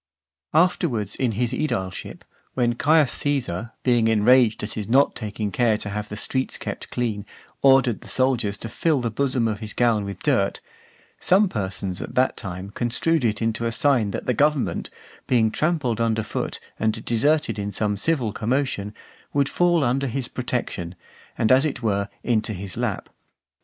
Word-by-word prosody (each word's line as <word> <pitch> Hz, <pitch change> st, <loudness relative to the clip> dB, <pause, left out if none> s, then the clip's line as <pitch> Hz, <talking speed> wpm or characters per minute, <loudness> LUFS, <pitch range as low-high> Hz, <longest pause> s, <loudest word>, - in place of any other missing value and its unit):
Afterwards 155 Hz, -, +2 dB
in 125 Hz, -4 st, 0 dB
his 120 Hz, +3 st, -1 dB
aedileship, 95 Hz, -11 st, -3 dB, 0.3 s
when 120 Hz, -2 st, +2 dB
Caius 145 Hz, +1 st, +3 dB
Caesar, 120 Hz, -7 st, -2 dB
being 120 Hz, -3 st, +3 dB
enraged 115 Hz, +1 st, +4 dB
at 105 Hz, -, -4 dB
his 105 Hz, -1 st, -5 dB
not 135 Hz, +4 st, +4 dB
taking 105 Hz, -2 st, -4 dB
care 115 Hz, -2 st, +2 dB
to 105 Hz, -, -5 dB
have 105 Hz, +1 st, -4 dB
the 105 Hz, -, -6 dB
streets 130 Hz, +4 st, -1 dB
kept -, -, -6 dB
clean, 110 Hz, -4 st, -2 dB, 0.4 s
ordered 135 Hz, -4 st, +4 dB
the -, -, -12 dB
soldiers 125 Hz, -6 st, 0 dB
to 115 Hz, -, -6 dB
fill 150 Hz, +6 st, +1 dB
the 120 Hz, -2 st, -2 dB
bosom 130 Hz, -1 st, 0 dB
of 105 Hz, -2 st, -2 dB
his 110 Hz, -1 st, -5 dB
gown 115 Hz, -4 st, +2 dB
with 100 Hz, -1 st, -7 dB
dirt, -, -, +1 dB, 0.6 s
some 195 Hz, +3 st, +4 dB
persons 95 Hz, -, -3 dB
at -, -, -7 dB
that 130 Hz, +1 st, +2 dB
time 95 Hz, -1 st, -6 dB
construed 125 Hz, +8 st, +1 dB
it 110 Hz, -1 st, 0 dB
into 115 Hz, +1 st, 0 dB
a -, -, -1 dB
sign 120 Hz, -4 st, +2 dB
that -, -, -5 dB
the 125 Hz, -, +1 dB
government, 145 Hz, +2 st, +1 dB, 0.4 s
being 115 Hz, -4 st, +3 dB
trampled 145 Hz, -6 st, 0 dB
under 110 Hz, -1 st, +1 dB
foot -, -, -3 dB, 0.2 s
and 110 Hz, 0 st, -1 dB
deserted 120 Hz, -1 st, +1 dB
in 100 Hz, 0 st, -3 dB
some 105 Hz, +1 st, 0 dB
civil 120 Hz, -1 st, 0 dB
commotion, 110 Hz, -3 st, -1 dB, 0.4 s
would 140 Hz, -1 st, +2 dB
fall 175 Hz, -3 st, +2 dB
under 135 Hz, +3 st, +1 dB
his 125 Hz, 0 st, -2 dB
protection, 120 Hz, -9 st, -4 dB, 0.4 s
and 110 Hz, -, +2 dB
as 130 Hz, +2 st, +6 dB
it 135 Hz, -5 st, -3 dB
were 100 Hz, -2 st, 0 dB
into 110 Hz, -2 st, 0 dB
his 95 Hz, -1 st, -6 dB
lap. -, -, -2 dB
115 Hz, 170 wpm, -23 LUFS, 105-135 Hz, 0.6 s, as